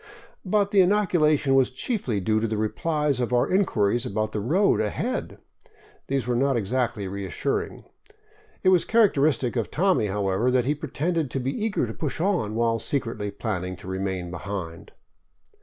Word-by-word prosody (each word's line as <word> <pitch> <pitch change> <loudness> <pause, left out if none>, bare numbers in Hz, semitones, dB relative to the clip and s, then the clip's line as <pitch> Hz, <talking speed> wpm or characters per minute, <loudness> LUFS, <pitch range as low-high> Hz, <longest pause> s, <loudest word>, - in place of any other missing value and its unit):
But 200 +1 +1
the 200 -2 +6
inoculation 175 -8 +3
was 135 -1 +4
chiefly 130 - -2
due 110 +3 +1
to 115 - 0
the 110 -1 -2
re 110 0 0
plies 150 -2 0
to 125 0 0
our 120 - +3
inquiries 120 - +2
about 110 -3 -2
the 110 - -2
road 175 - +2
ahead. 105 -1 -2 0.7
These 135 -3 -1
were 120 0 0
not 135 +1 +2
exactly 115 -1 -1
re 100 +1 -5
assuring. 95 - -3 0.8
It 185 - +5
was 180 -2 +4
characteristic 150 - +2
of 115 -3 -1
Tommy, 180 - +2
however, 100 +3 0
that 125 -1 +2
he 145 - +2
pretended 155 +1 -2
to 135 - -3
be 130 +2 -2
eager 215 - 0
to 110 - -6
push 150 +3 -4
on, 170 - 0
while 115 0 +1
secretly 115 -3 -2
planning 95 -3 -4
to 90 - -13
remain 95 -2 -3
behind. 90 -3 -6
125 Hz, 170 wpm, -25 LUFS, 105-155 Hz, 0.8 s, the